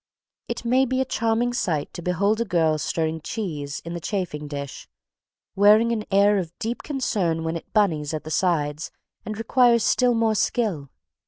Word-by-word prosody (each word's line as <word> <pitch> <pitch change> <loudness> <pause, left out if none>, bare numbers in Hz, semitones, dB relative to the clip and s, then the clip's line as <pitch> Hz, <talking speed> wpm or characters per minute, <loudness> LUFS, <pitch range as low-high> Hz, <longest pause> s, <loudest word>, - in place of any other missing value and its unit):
It - - -5
may 255 +3 +3
be 260 +1 0
a 265 - +1
charming 235 0 0
sight 160 -11 -1
to - - -7
behold 200 +6 +1
a - - +3
girl 160 -5 +1
stirring 160 +1 -2
cheese 150 -9 -5
in 170 - -5
the 170 - -4
chafing 170 -5 -3
dish, 140 -1 -7 0.7
wearing 215 +4 +5
an 215 -2 -2
air 200 +1 +4
of 170 -2 -6
deep 235 +1 -3
concern 195 - -1
when 165 +1 -2
it 165 - -8
"bunnies" 165 -9 +1
at 155 -1 -4
the 155 - -7
sides 155 -4 0 0.4
and 215 -1 -4
requires 235 0 +3
still 250 -1 +3
more 225 -1 +2
skill. 200 - -1
195 Hz, 175 wpm, -24 LUFS, 160-225 Hz, 0.7 s, wearing